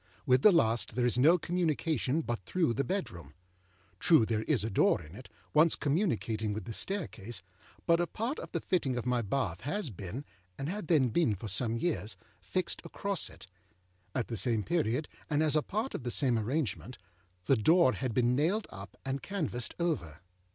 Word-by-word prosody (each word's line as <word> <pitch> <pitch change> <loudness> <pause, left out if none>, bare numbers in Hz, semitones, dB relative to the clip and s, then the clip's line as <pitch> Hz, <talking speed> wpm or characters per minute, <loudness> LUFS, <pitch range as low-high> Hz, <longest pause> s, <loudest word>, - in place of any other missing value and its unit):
With 125 0 +4
the 210 - +8
last 115 - +2
there 125 0 +1
is 125 0 +1
no 160 +7 +6
communication 160 -4 0
but 120 -6 -3
through 165 - 0
the 140 - 0
bedroom. 85 - -4 0.6
True, 160 -10 +5
there 110 -1 0
is 135 -9 +2
a 110 - -1
door - - +3
in 75 +2 -12
it, 120 +5 -11 0.2
once 155 +2 +5
communicating 115 - 0
with 105 -2 -5
the 115 - -5
staircase; 120 - -3 0.4
but 170 0 +4
a 175 - +1
part 235 - -3
of - - -8
the - - -2
fitting 145 -9 0
of 120 - -3
my 125 -1 +1
bath 100 -6 -2
has 160 - -2
beenâand 100 +7 -6 0.3
had 170 +6 -4
then 145 -7 +4
been 115 -3 +2
for 105 +4 -7
some 110 +4 +1
yearsâfixed 115 - -3
across 200 -2 -1
it. - - -13 0.7
At 125 - -1
the 115 - -4
same 115 -1 +1
period, 150 -3 0 0.2
and 150 0 +2
as 155 -1 +3
a 155 - +4
part 220 - -3
of - - -4
the 125 - -3
same 125 0 +2
arrangement, 125 0 -2 0.5
âthe 130 -5 +3
door 170 - +5
had 130 -2 -2
been 125 0 +3
nailed 180 - +1
up 100 0 -10
and 135 0 -2
canvased 155 - -2
over. 85 - -2
130 Hz, 185 wpm, -31 LUFS, 110-165 Hz, 0.7 s, the